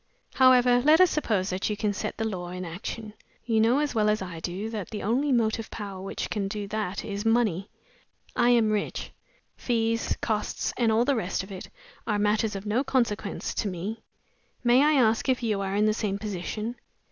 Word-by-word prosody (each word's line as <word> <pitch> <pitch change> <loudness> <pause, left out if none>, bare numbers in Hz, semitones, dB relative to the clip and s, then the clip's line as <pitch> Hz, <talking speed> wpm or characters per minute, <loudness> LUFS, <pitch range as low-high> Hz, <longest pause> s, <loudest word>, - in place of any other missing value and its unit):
However, 250 -2 +6
let 305 +5 +5
us 370 -2 +6
suppose 210 -10 0
that 185 +3 -1
you 210 - -2
can 210 -1 0
set - - -4
the 225 - -1
law 180 -4 -4
in 180 0 -5
action. 210 +5 -6 0.3
You 225 -2 +2
know 235 +4 +4
as 295 0 0
well 215 -2 +2
as 210 0 +2
I 180 -3 -6
do 185 +6 -4
that 210 -5 -5
the 210 - -5
only 260 +8 +1
motive 225 -2 +1
power 200 -3 -6
which 195 - -5
can 200 -2 -1
do 205 0 -4
that 205 -3 -3
is 200 0 -4
money. 225 -5 +1 0.7
I 240 - +3
am 230 -3 +4
rich; 210 -1 -2 0.5
fees, 230 -1 0
costs, 215 -2 -2
and 230 -2 +2
all 225 +2 +3
the 280 - +2
rest 190 -4 -2
of 190 - -11
it 185 - -8 0.4
are 210 -2 +1
matters 210 +1 +1
of 195 +1 -6
no 210 +2 0
sort - - +4
of 270 - -2
consequence 225 -6 -1
to 215 - -1
me. 200 +5 -4 0.6
May 245 +2 +5
I 305 +1 +4
ask 230 -2 +3
if 255 -1 +1
you 210 -3 0
are 195 0 -2
in 210 +1 +3
the 215 - +3
same 210 -2 -2
position?" 210 +3 -4
215 Hz, 210 wpm, -27 LUFS, 200-235 Hz, 0.7 s, However